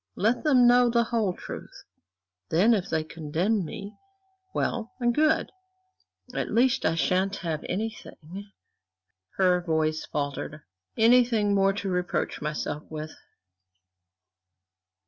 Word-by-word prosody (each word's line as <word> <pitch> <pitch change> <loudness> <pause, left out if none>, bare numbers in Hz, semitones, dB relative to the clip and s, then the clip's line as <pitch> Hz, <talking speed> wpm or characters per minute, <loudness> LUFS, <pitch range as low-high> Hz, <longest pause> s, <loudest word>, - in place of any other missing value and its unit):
Let 225 +5 +1
them 265 -6 +5
know 245 0 +6
the 235 0 +3
whole 225 -5 -1
truth; - - -9 0.7
then, 195 +9 +4
if 195 -3 -1
they 160 - 0
condemn 165 +7 -1
me, 200 +6 -7 0.6
well 235 -9 -2
and 240 -1 +2
good. 310 +4 +2 0.8
At - - -2
least 255 +4 +2
I 165 - +1
shan't 185 +4 +1
have 160 -2 -2
anything" 200 -2 -6 0.9
her 180 -2 +3
voice 160 -2 0
faltered 145 +1 -4 0.3
"anything 230 -3 +4
more 195 0 +3
to 200 0 -4
reproach 180 -1 -2
myself 150 0 -3
with." 155 0 -6
195 Hz, 115 wpm, -26 LUFS, 160-235 Hz, 0.9 s, know